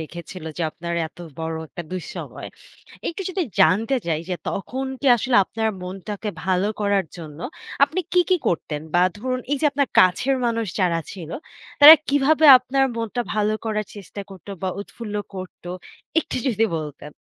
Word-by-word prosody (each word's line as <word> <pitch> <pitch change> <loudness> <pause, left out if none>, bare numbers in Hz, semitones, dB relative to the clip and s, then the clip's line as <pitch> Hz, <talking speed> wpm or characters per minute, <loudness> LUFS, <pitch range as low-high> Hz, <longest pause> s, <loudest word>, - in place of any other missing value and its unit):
রেখেছিল 170 +2 -8
যে 175 - -2
আপনার 170 +1 -5
এত 160 - -25 0.2
বড় 160 0 -3
একটা 175 - -7
দুঃসময়ে। 185 -2 -6 0.6
একটু 340 +3 -4
যদি 370 -1 -1 0.2
জানতে 225 +8 +4
চাই 160 -2 0
যে, 180 - -1
তখন 255 +7 -3 0.2
কি 280 - -2
আসলে 245 +1 +1
আপনার 220 +3 -2
মনটাকে 195 +3 -5 0.2
ভালো 190 +2 +1
করার 200 -2 +2
জন্য 155 -3 -9 0.5
আপনি 315 +6 -3
কি, 360 - +5
কি 365 - +6
করতেন? 150 -3 -2
বা 175 - +5 0.2
ধরুন 255 +2 -2
এই 290 - +3
যে - - -1
আপনার 280 -1 0
কাছের 225 +9 +3
মানুষ 230 -2 0
যারা 170 -2 +2
ছিল, 170 -4 -8 0.5
তারা 300 +2 +13
কিভাবে 290 +3 +4
আপনার 270 +2 +1
মনটা 230 +1 -2
ভালো 215 0 +1
করার 215 -2 -1
চেষ্টা 200 0 -8
করতো 190 +1 -11
বা 190 - 0
উৎফুল্ল 210 +1 -8 0.2
করতো, 185 -1 -8 0.5
একটু - - -5
যদি 225 -2 +2
বলতেন? 150 -1 -8
205 Hz, 165 wpm, -23 LUFS, 175-255 Hz, 0.6 s, তারা